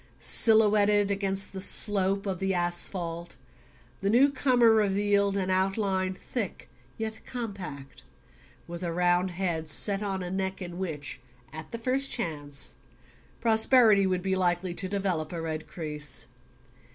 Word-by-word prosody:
Silhouetted 210 Hz, -2 st, +3 dB
against 195 Hz, -1 st, -1 dB
the 190 Hz, -, -6 dB
slope 195 Hz, 0 st, +1 dB
of 190 Hz, -3 st, -3 dB
the 195 Hz, -1 st, -1 dB
asphalt, 175 Hz, -1 st, -2 dB, 0.7 s
the 195 Hz, -, 0 dB
newcomer 255 Hz, -1 st, +4 dB
revealed 200 Hz, -1 st, +2 dB
an 190 Hz, -1 st, -1 dB
outline 190 Hz, 0 st, 0 dB
thick 210 Hz, +1 st, -5 dB, 0.3 s
yet 220 Hz, 0 st, -4 dB
compact, 190 Hz, -, -7 dB, 0.6 s
with 170 Hz, 0 st, -8 dB
a 175 Hz, -2 st, -3 dB
round 175 Hz, +1 st, +1 dB
head 175 Hz, -3 st, -3 dB
set 195 Hz, +6 st, +4 dB
on 195 Hz, -2 st, -3 dB
a 175 Hz, -, -5 dB
neck 190 Hz, 0 st, -3 dB
in 175 Hz, -2 st, -7 dB
which, 155 Hz, -6 st, -5 dB, 0.3 s
at 160 Hz, 0 st, -8 dB
the 230 Hz, -, -5 dB
first 260 Hz, +4 st, 0 dB
chance, 145 Hz, -, +1 dB, 0.7 s
prosperity 220 Hz, -3 st, +4 dB
would 185 Hz, -1 st, -1 dB
be 190 Hz, -1 st, 0 dB
likely 175 Hz, -1 st, 0 dB
to 185 Hz, +1 st, -2 dB
develop 185 Hz, -6 st, -2 dB
a 170 Hz, -, -5 dB
red 160 Hz, -1 st, -5 dB
crease. 150 Hz, -2 st, -5 dB
190 Hz, 135 wpm, -27 LUFS, 175-205 Hz, 0.7 s, newcomer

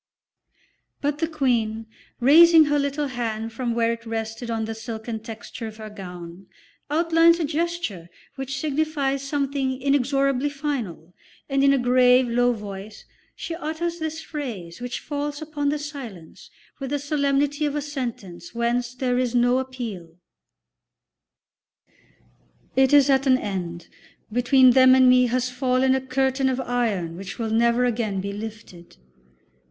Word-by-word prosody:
But 290 Hz, +1 st, -2 dB
the 325 Hz, -, 0 dB
Queen, 235 Hz, -8 st, 0 dB, 0.3 s
raising 320 Hz, +5 st, +7 dB
her 290 Hz, 0 st, +1 dB
little 280 Hz, +1 st, -1 dB
hand 225 Hz, -3 st, -4 dB
from 235 Hz, 0 st, -2 dB
where 230 Hz, 0 st, +2 dB
it 230 Hz, 0 st, -9 dB
rested 225 Hz, +1 st, -5 dB
on 225 Hz, -1 st, -1 dB
the 225 Hz, -, -4 dB
silken 225 Hz, 0 st, -6 dB
texture 225 Hz, +1 st, -8 dB
of 215 Hz, 0 st, -10 dB
her 215 Hz, -1 st, -8 dB
gown, 180 Hz, -2 st, -10 dB, 0.4 s
outlines 330 Hz, +2 st, +4 dB
a 325 Hz, -, 0 dB
gesture 310 Hz, -, -3 dB, 0.2 s
which 270 Hz, -1 st, -5 dB
signifies 290 Hz, -2 st, -1 dB
something 275 Hz, -2 st, -2 dB
inexorably 275 Hz, 0 st, +1 dB
final, 250 Hz, -, -4 dB, 0.3 s
and 275 Hz, -1 st, +1 dB
in 275 Hz, -, +6 dB
a 275 Hz, -, +3 dB
grave, 250 Hz, 0 st, +4 dB
low 245 Hz, +1 st, +2 dB
voice 205 Hz, -2 st, -8 dB, 0.3 s
she 335 Hz, -, -6 dB
utters 335 Hz, +1 st, -3 dB
this 320 Hz, 0 st, -4 dB
phrase 235 Hz, -, -6 dB
which 245 Hz, 0 st, -4 dB
falls 290 Hz, 0 st, -4 dB
upon 295 Hz, -2 st, -2 dB
the 300 Hz, -, 0 dB
silence 265 Hz, -, -9 dB, 0.3 s
with 270 Hz, -2 st, -4 dB
the 290 Hz, -, 0 dB
solemnity 285 Hz, +1 st, 0 dB
of 290 Hz, -, -3 dB
a -, -, 0 dB
sentence 230 Hz, -, -6 dB
whence 240 Hz, +1 st, -1 dB
there 250 Hz, -1 st, 0 dB
is 250 Hz, -1 st, -1 dB
no 245 Hz, +1 st, +3 dB
appeal: 225 Hz, -11 st, -7 dB, 2.6 s
"It 265 Hz, 0 st, +4 dB
is 285 Hz, -2 st, +6 dB
at 270 Hz, 0 st, +3 dB
an 255 Hz, -1 st, +5 dB
end. 180 Hz, -6 st, -5 dB, 0.4 s
Between 250 Hz, +2 st, +5 dB
them 260 Hz, 0 st, +7 dB
and 260 Hz, -1 st, +6 dB
me 250 Hz, 0 st, +5 dB
has 250 Hz, +1 st, -1 dB
fallen 255 Hz, +1 st, +2 dB
a 265 Hz, -, +1 dB
curtain 265 Hz, 0 st, 0 dB
of 260 Hz, 0 st, -1 dB
iron 220 Hz, -10 st, -1 dB
which 195 Hz, +1 st, -7 dB
will 225 Hz, -2 st, -3 dB
never 235 Hz, +2 st, +3 dB
again 220 Hz, -5 st, -1 dB
be 200 Hz, +1 st, -4 dB
lifted." 210 Hz, -, -9 dB
255 Hz, 145 wpm, -24 LUFS, 225-280 Hz, 2.6 s, raising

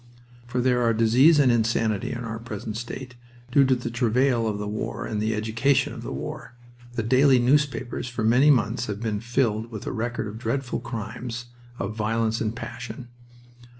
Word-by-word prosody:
For 125 Hz, +1 st, -1 dB
there 125 Hz, -1 st, +2 dB
are 115 Hz, -1 st, +2 dB
disease 125 Hz, +8 st, +5 dB
and 135 Hz, -4 st, +5 dB
insanity 110 Hz, -3 st, +1 dB
in 120 Hz, 0 st, -4 dB
our 115 Hz, 0 st, -5 dB
present 110 Hz, -2 st, -6 dB
state, 125 Hz, +2 st, -6 dB, 0.4 s
due 140 Hz, +2 st, +6 dB
to 130 Hz, 0 st, +3 dB
the 120 Hz, -1 st, -4 dB
travail 120 Hz, 0 st, +2 dB
of 105 Hz, -2 st, -1 dB
the 105 Hz, 0 st, -4 dB
war 105 Hz, +1 st, -4 dB
and 105 Hz, -1 st, -2 dB
the 110 Hz, +1 st, 0 dB
education 115 Hz, +5 st, +1 dB
of -, -, -8 dB
the -, -, -6 dB
war. -, -, -6 dB, 0.4 s
The 115 Hz, -, -1 dB
daily 130 Hz, +3 st, +5 dB
newspapers 130 Hz, -1 st, +1 dB
for 120 Hz, -2 st, -3 dB
many 125 Hz, +7 st, +5 dB
months 120 Hz, -3 st, +2 dB
have 105 Hz, -1 st, -4 dB
been 110 Hz, -2 st, -2 dB
filled 115 Hz, -2 st, 0 dB
with 110 Hz, -3 st, -7 dB
the -, -, -3 dB
record 120 Hz, 0 st, -2 dB
of 110 Hz, +1 st, -7 dB
dreadful 130 Hz, +1 st, -2 dB
crimes, 120 Hz, +1 st, -6 dB, 0.3 s
of 105 Hz, -1 st, -4 dB
violence 110 Hz, +1 st, 0 dB
and 110 Hz, 0 st, -1 dB
passion. 120 Hz, 0 st, -7 dB
115 Hz, 185 wpm, -25 LUFS, 110-125 Hz, 0.4 s, due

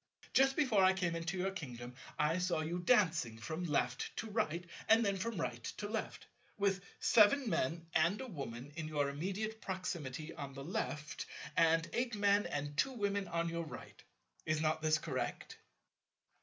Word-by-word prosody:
Just 270 Hz, 0 st, +5 dB
before 230 Hz, -10 st, +4 dB
I 185 Hz, 0 st, +6 dB
came 175 Hz, -3 st, 0 dB
into 165 Hz, +2 st, -2 dB
your 190 Hz, +2 st, 0 dB
kingdom, 125 Hz, -8 st, -7 dB, 0.2 s
I 155 Hz, +4 st, +2 dB
saw 180 Hz, -3 st, +1 dB
you 170 Hz, +3 st, -2 dB
dancing 170 Hz, -, +3 dB
from 160 Hz, +11 st, -4 dB
left 135 Hz, -4 st, 0 dB
to 220 Hz, -, -4 dB
right, 175 Hz, -5 st, 0 dB, 0.2 s
and 225 Hz, +1 st, +6 dB
then 200 Hz, -1 st, +2 dB
from 205 Hz, 0 st, -3 dB
right 120 Hz, -7 st, -3 dB
to 205 Hz, -, -3 dB
left, 220 Hz, +1 st, -4 dB, 0.3 s
with 195 Hz, -2 st, +1 dB, 0.2 s
Seven 235 Hz, +4 st, +5 dB
Men 165 Hz, -3 st, 0 dB
and 170 Hz, +6 st, +3 dB
a 265 Hz, -, -4 dB
Woman 140 Hz, -, -6 dB
in 160 Hz, -1 st, -4 dB
your 145 Hz, -2 st, 0 dB
immediate 195 Hz, +9 st, -3 dB
proximity 165 Hz, -6 st, -4 dB
on 140 Hz, -3 st, -7 dB
the 135 Hz, -, -6 dB
left, 150 Hz, -2 st, -3 dB, 0.3 s
and 165 Hz, 0 st, +4 dB
eight 240 Hz, -2 st, 0 dB
Men 205 Hz, 0 st, +3 dB
and 145 Hz, 0 st, -3 dB
two 265 Hz, -, +2 dB
Women 200 Hz, -4 st, -1 dB
on 170 Hz, 0 st, 0 dB
your 170 Hz, 0 st, -2 dB
right. 155 Hz, -, -10 dB, 0.4 s
Is 155 Hz, 0 st, 0 dB
not 155 Hz, 0 st, +1 dB
this 155 Hz, 0 st, +3 dB
correct?" 130 Hz, -6 st, -4 dB
170 Hz, 170 wpm, -36 LUFS, 150-200 Hz, 0.4 s, I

